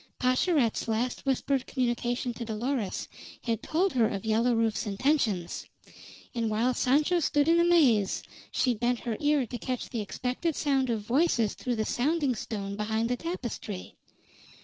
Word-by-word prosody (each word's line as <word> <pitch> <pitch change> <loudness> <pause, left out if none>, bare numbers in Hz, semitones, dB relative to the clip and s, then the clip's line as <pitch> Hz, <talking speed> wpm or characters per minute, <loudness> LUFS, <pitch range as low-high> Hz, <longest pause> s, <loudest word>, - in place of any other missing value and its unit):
Pascherette's 255 -1 +2
last 235 +4 -1
whispered 270 0 0
communication 245 -1 -1
to 235 - -6
Dolores 225 0 -2 0.4
had 230 -3 -1
told 360 +5 +1
her 235 -4 +4
of 200 0 -4
Yellow 230 +2 +2
Rufe's 225 0 0
intentions; 205 - 0 0.7
and 230 -2 -1
while 230 +4 +1
Sancho 295 +8 +2
stood 290 -2 +2
in 335 +1 +5
amaze, 290 - +4 0.3
she 250 - +2
bent 240 +2 0
her 235 -2 -2
ear 295 -3 +2
to 240 +2 -6
catch 255 +1 -3
the 230 - -2
expected 250 - -2
sound 270 -3 +1
of 225 -2 0
voices 235 - +2
through 245 -1 -3
the 220 -1 -1
sounding 285 +3 +1
stone 200 -3 -4
behind 220 +2 -1
the - - +2
tapestry. 240 - -5
245 Hz, 150 wpm, -28 LUFS, 220-280 Hz, 0.7 s, in